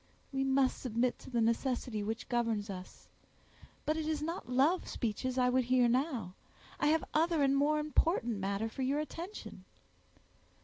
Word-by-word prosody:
"We 270 0 +1
must 270 -1 +2
submit 245 0 0
to - - -11
the 240 -3 +1
necessity 230 -1 0
which 220 +3 -4
governs 230 -4 0
us. 185 -1 -10 0.8
But 305 +1 +1
it 315 -1 -2
is 310 -1 -1
not 330 -5 -4
love 280 +9 +3
speeches 250 +3 -2
I 250 -1 +4
would 255 0 +2
hear 250 0 +4
now; 245 - 0 0.5
I - - +2
have 315 +1 +3
other 320 -1 +3
and 275 0 +3
more 290 +2 +3
important 300 - +1
matter 200 +3 -1
for 225 +4 -6
your 275 +3 +1
attention." 335 +6 -7
255 Hz, 165 wpm, -33 LUFS, 230-300 Hz, 0.8 s, I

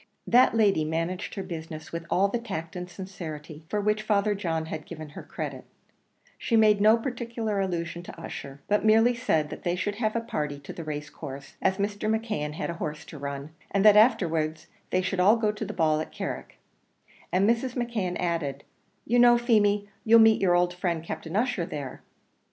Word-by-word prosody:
That 245 -1 +5
lady 200 -7 +4
managed 165 +5 -3
her 195 - -3
business 160 -3 -7
with 170 0 -5
all 195 +2 +3
the 230 +4 -2
tact 165 -8 -6
and 180 0 -5
sincerity 165 -5 -8
for 210 - 0
which 210 +1 +1
Father 210 -1 +2
John 165 -5 -2
had 160 -1 -6
given 155 -2 -8
her 145 - -9
credit; - - -6 0.8
she 230 - 0
made 215 -2 +5
no 215 +2 +6
particular 230 -3 -3
allusion 175 -3 -2
to 175 - -11
Ussher, 140 -3 -8
but 210 0 +2
merely 225 +3 +5
said 160 -12 0
that - - -7
they 175 -2 0
should 200 +3 -2
have 215 -1 0
a - - +2
party 150 -11 -3
to 140 - -8
the 170 - -7
race 150 -1 -5
course, 140 -2 -9
as 190 0 +2
Mr. 205 +1 -1
McKeon 215 -9 -1
had 175 +2 -3
a 170 - -9
horse 155 0 -4
to 150 - -10
run, 140 +1 -5 0.2
and 195 +1 +1
that 210 -1 +9
afterwards 165 -9 +3 0.2
they 185 - +1
should 185 0 -2
all 200 +5 +6
go 220 -2 +1
to 210 +1 -5
the 210 - -5
ball 155 -5 +2
at - - -6
Carrick; - - -6 0.7
and 185 +3 +3
Mrs. 235 +2 +1
McKeon 230 -8 -2
added, 165 -6 -2 0.4
"You 240 +2 +2
know, 240 0 +7
Feemy, 210 -4 +2 0.2
you'll 230 +1 +7
meet 220 -1 +6
your 180 -2 +4
old 175 0 +2
friend 175 -3 -2
Captain 160 +1 -6
Ussher 220 -6 0
there." 145 -7 -6
185 Hz, 195 wpm, -27 LUFS, 160-215 Hz, 0.8 s, that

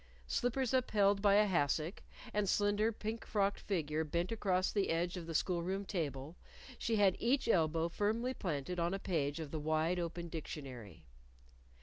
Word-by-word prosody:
Slippers 245 - 0
upheld 205 -6 +3
by 200 -1 +5
a 210 +1 +6
hassock, 165 -1 0 0.3
and 205 -2 +1
slender 205 +2 +2
pink 220 +1 -5
frocked 200 -1 0
figure 160 -5 -1
bent 170 +5 -1
across 190 -4 +1
the 200 -2 0
edge 170 +2 0
of 175 -2 -6
the 165 - -4
school 175 +2 +1
room 190 +3 -2
table, 150 -5 -3 0.4
she 230 - 0
had 200 -3 +4
each 260 +3 +1
elbow 165 -5 +2
firmly 220 +8 0
planted 175 - -3
on 170 +3 +1
a - - -1
page 155 -6 -1
of 155 -3 -6
the 155 - -3
wide 155 +3 +1
open, 170 0 -4
dictionary. 130 - -7
180 Hz, 170 wpm, -35 LUFS, 160-205 Hz, 0.4 s, a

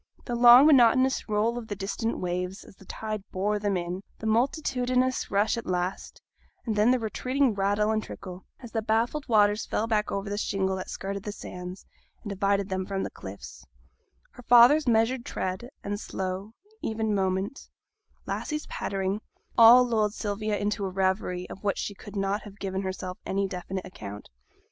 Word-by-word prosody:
The 245 - -4
long 240 +3 +8
monotonous 260 -3 +4
roll 220 +3 +1
of 225 - -9
the 205 - -4
distant 205 +4 -2
waves, 180 +1 -3
as - - -16
the 195 - -17
tide 215 +2 -5
bore 205 +3 0
them 205 -2 0
in, 175 +2 -4 0.2
the - - -8
multitudinous 255 +1 +1
rush 205 +3 +2
at 230 - -6
last, 180 +1 -3 0.5
and 220 -3 -1
then 210 +3 +4
the 255 - +4
retreating 255 +3 0
rattle 205 +2 +1
and 220 0 +1
trickle, 185 -1 -9 0.2
as 240 -3 -10
the 225 - -1
baffled 230 +7 0
waters 210 -1 +3
fell 220 - 0
back 215 -2 0
over 200 +1 -3
the 205 +1 -2
shingle 190 -2 0
that 185 - -6
skirted 200 +1 -4
the 210 +1 -5
sands, 180 -2 -8 0.4
and 205 - -5
divided 200 0 +1
them 190 0 -1
from 195 0 -3
the - - -4
cliffs; 95 +1 -10 0.7
her - - -13
father's 250 +5 +7
measured 235 +2 +2
tread, 190 +5 -4
and 205 0 -3
slow, 190 +2 -5 0.3
even 220 -1 -1
movement; 190 +4 -1 0.6
Lassie's 305 -1 -3
pattering 195 +1 -2 0.3
all 235 +2 +9
lulled 220 -3 0
Sylvia 210 0 -2
into 205 0 -1
a 195 - -1
reverie, 185 -1 -1
of 190 - -10
which 200 - 0
she 205 - -3
could 205 +1 -12
not 195 +1 0
have 205 -1 -12
given 190 -2 -3
herself 185 -1 -5
any 195 0 -1
definite 185 0 -5
account. 105 - -9
205 Hz, 175 wpm, -27 LUFS, 190-230 Hz, 0.7 s, all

